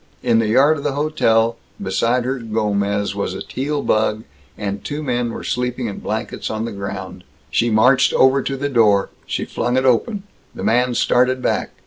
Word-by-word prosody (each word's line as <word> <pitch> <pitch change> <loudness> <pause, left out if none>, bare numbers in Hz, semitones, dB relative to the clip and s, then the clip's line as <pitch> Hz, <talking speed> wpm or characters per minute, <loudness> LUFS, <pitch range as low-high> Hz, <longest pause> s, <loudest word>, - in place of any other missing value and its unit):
In 115 -2 +3
the 115 - +1
yard 140 +8 +4
of - - -8
the 145 - -1
hotel, 115 -6 +1 0.2
beside 115 +6 0
her 130 +1 -2
Gomez, 100 -3 -1
was - - -3
a - - -5
Teal 145 +2 -3
bug, 110 0 +1 0.3
and 100 -1 -4
two 150 +1 -4
men 120 -3 -1
were - - -7
sleeping 125 0 -2
in 105 -3 -5
blankets - - -4
on 110 +1 -3
the - - -4
ground. 100 -1 -6 0.3
She 120 - +2
marched 125 +5 +4
over 130 +1 +4
to 135 +1 -3
the 140 +2 -1
door. 105 -7 +3 0.2
She - - -2
flung 125 +1 -1
it 130 - +1
open. 190 - +1 0.3
The - - -6
man 125 +1 +2
started 125 +2 +2
back. - - -1
120 Hz, 185 wpm, -20 LUFS, 110-130 Hz, 0.3 s, yard